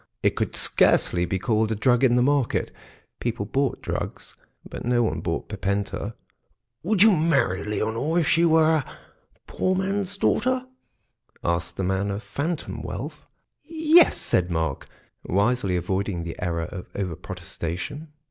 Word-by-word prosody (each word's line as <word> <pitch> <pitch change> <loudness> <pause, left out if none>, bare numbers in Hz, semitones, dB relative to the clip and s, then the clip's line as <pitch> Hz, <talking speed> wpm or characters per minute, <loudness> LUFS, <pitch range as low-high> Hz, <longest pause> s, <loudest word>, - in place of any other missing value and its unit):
It - - +2
could - - -2
scarcely 90 0 +3
be 95 - -1
called 110 +1 +1
a - - +1
drug 125 +3 +2
in 120 -2 +5
the 125 - +4
market; 140 -2 +1 0.5
people 120 -4 -2
bought 135 +4 -1
drugs, - - -5 0.3
but - - -7
no 120 0 +2
one 110 - -1
bought - - -3
Pipenta. 100 +2 -3 0.7
"Would 200 +2 +3
you 220 - +7
marry 145 - +1
Leonore 110 +9 -1
if 165 -4 +2
she 165 0 +3
were 160 -1 +5
a 145 - -6 0.5
poor 185 0 0
man's 195 +1 -1
daughter?" 255 +5 +1 0.8
asked 85 0 -1
the 95 - -1
man 95 +2 0
of 100 +3 -4
phantom 155 +3 -4
wealth. - - -6 0.4
"Yes," 320 +1 +4
said 90 0 +1
Mark, 80 -4 -2 0.4
wisely 100 0 +1
avoiding 95 0 -1
the 85 -1 -6
error 85 -2 -1
of 90 +1 -8
over 95 -5 -2
protestation. 90 - -6
115 Hz, 145 wpm, -24 LUFS, -, 0.8 s, you